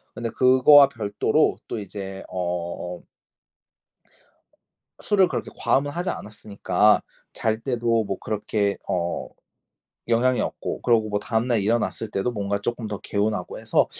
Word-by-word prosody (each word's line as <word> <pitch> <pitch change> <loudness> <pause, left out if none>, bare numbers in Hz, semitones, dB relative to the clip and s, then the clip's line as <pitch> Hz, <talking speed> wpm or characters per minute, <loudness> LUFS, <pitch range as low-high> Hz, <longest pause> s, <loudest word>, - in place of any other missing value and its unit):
근데 115 0 -3
그거와 130 +2 +6
별도로 105 -6 +1
또 115 - -4
이제 95 -1 -7
어 90 0 -4 2.0
술을 195 -3 +3
그렇게 - - -4
과음은 145 +2 +1
하지 175 +5 -2
않았으니까 105 0 +1 0.3
잘 110 0 -1
때도 115 -3 0
뭐 95 -1 -4
그렇게 105 -1 -1
어 85 -1 -2 0.8
영향이 125 +2 +2
없고 - - -4
그러고 115 -3 +3
뭐 105 0 -1
다음날 115 0 0
일어났을 110 +1 0
때도 110 +6 -1
뭔가 100 -1 -2
쪼끔 120 0 -3
더 105 -1 -4
개운하고 105 -2 -2
해서 - - +2
110 Hz, 275 characters per minute, -24 LUFS, 100-120 Hz, 2.0 s, 그거와